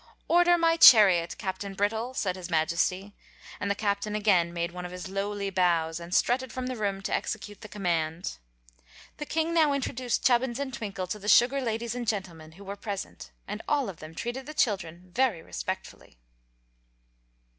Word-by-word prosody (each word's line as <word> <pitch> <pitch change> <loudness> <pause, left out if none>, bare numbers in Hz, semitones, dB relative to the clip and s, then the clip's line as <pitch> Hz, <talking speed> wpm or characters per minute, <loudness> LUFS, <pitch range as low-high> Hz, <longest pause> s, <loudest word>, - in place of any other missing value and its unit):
"Order 350 0 +5
my 330 -1 +3
chariot, 190 - +7
Captain 195 +1 -5
Brittle," 220 +5 -1
said 185 -6 -1
his 185 -1 -8
Majesty; 175 +4 0 0.5
and 200 - -2
the 200 - +1
Captain 205 0 -1
again 190 -5 +3
made 170 0 -3
one 180 0 -7
of 180 - -6
his 180 0 -7
lowly 200 +1 -3
bows 170 -3 +1
and 170 +1 -9
strutted 250 +5 +1
from 255 +2 -4
the 255 0 -3
room 200 -3 -2
to - - -3
execute 205 -2 -4
the - - -8
command. 170 -4 -2 0.8
The 300 - -6
king 325 +1 0
now 310 -4 +4
introduced 255 -3 -2
Chubbins 245 -1 +3
and 275 -2 -4
Twinkle 200 -5 -4
to 185 +4 -5
the 205 - -9
sugar 260 +5 +5
ladies 230 -1 -2
and 245 -1 -5
gentlemen 170 -7 -4
who 195 +4 -13
were 200 +1 -6
present, 200 -1 -6 0.2
and 210 +2 -5
all 280 -7 +1
of 180 - -8
them 155 +1 -11
treated 250 - -5
the 305 - -8
children 180 - -1
very 235 -10 +1
respectfully. - - -6
200 Hz, 175 wpm, -28 LUFS, 180-245 Hz, 0.8 s, chariot